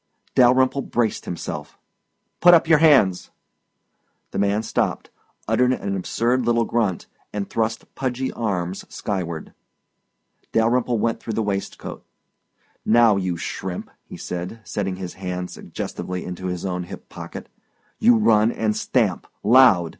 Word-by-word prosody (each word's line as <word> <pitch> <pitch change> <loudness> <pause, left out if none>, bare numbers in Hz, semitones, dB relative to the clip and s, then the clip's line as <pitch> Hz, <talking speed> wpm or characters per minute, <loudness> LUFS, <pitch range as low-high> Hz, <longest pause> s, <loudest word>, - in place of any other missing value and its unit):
Dalyrimple 130 +2 +4
braced 115 -2 0
himself. 85 - -6 0.6
"Put 175 0 +8
up 165 - +3
your 160 -2 +6
hands!" 135 - +4 1.0
The - - -3
man 100 +2 +1
stopped, - - -1 0.4
uttered 125 0 +3
an 100 -5 -3
absurd 120 +7 0
little 115 0 +2
grunt, 110 -7 0 0.3
and 105 -1 -3
thrust 110 0 -2
pudgy 130 0 -2
arms 95 -5 -2
skyward. 85 -6 -4 1.0
Dalyrimple 120 +1 +2
went 115 +1 0
through 115 - -5
the 110 - 0
waistcoat. 100 -1 -4 0.8
"Now, 115 -1 +5
you 90 -3 -1
shrimp," 90 +2 -5
he - - -10
said, 90 +6 -5
setting 95 -2 -3
his 90 -1 -6
hand 90 -1 -5
suggestively 90 0 -5
to 95 +1 -6
his 90 0 -4
own 90 -2 -2
hip - - -10
pocket, - - -9 0.5
"you 235 +1 +6
run, 110 - +4
and 110 -2 -1
stamp - - 0 0.2
loud! 105 -7 +6
110 Hz, 130 wpm, -22 LUFS, 95-120 Hz, 1.0 s, Put